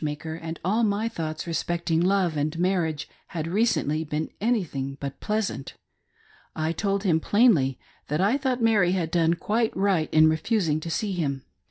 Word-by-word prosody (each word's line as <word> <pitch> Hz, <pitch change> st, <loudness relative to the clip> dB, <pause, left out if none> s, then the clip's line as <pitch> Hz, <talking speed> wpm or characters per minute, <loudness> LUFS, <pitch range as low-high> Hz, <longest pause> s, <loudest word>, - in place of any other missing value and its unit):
maker, 150 Hz, +1 st, -4 dB
and 165 Hz, 0 st, -6 dB
all 215 Hz, +5 st, +2 dB
my 210 Hz, +1 st, +1 dB
thoughts 155 Hz, -8 st, -4 dB
respecting 170 Hz, 0 st, -1 dB
love 185 Hz, -2 st, +2 dB
and 150 Hz, +2 st, -1 dB
marriage 170 Hz, -4 st, 0 dB, 0.3 s
ha4 165 Hz, +1 st, -3 dB
recently 175 Hz, -8 st, +1 dB
been 155 Hz, 0 st, -3 dB
anything 160 Hz, -, -1 dB
but 140 Hz, -1 st, -6 dB
pleasant. 210 Hz, -10 st, -2 dB, 0.8 s
I 160 Hz, 0 st, -1 dB
told 200 Hz, +2 st, -1 dB
him 170 Hz, -5 st, +3 dB
plainly 165 Hz, -, +3 dB, 0.3 s
tha,t 150 Hz, +2 st, -1 dB
I 210 Hz, +6 st, +3 dB
thought 255 Hz, -3 st, -1 dB
Mary 205 Hz, -6 st, +4 dB
had 170 Hz, -4 st, -1 dB
done 165 Hz, 0 st, +3 dB
quite 220 Hz, +6 st, -1 dB
right 190 Hz, -5 st, +1 dB
in, 155 Hz, 0 st, +6 dB
refusing 160 Hz, 0 st, +1 dB
to 165 Hz, -, -6 dB
see 200 Hz, +5 st, -1 dB
him. 175 Hz, -4 st, -1 dB
ONE -, -, -4 dB
OF -, -, -10 dB
eve's. -, -, -36 dB
170 Hz, 180 wpm, -25 LUFS, 155-200 Hz, 0.8 s, in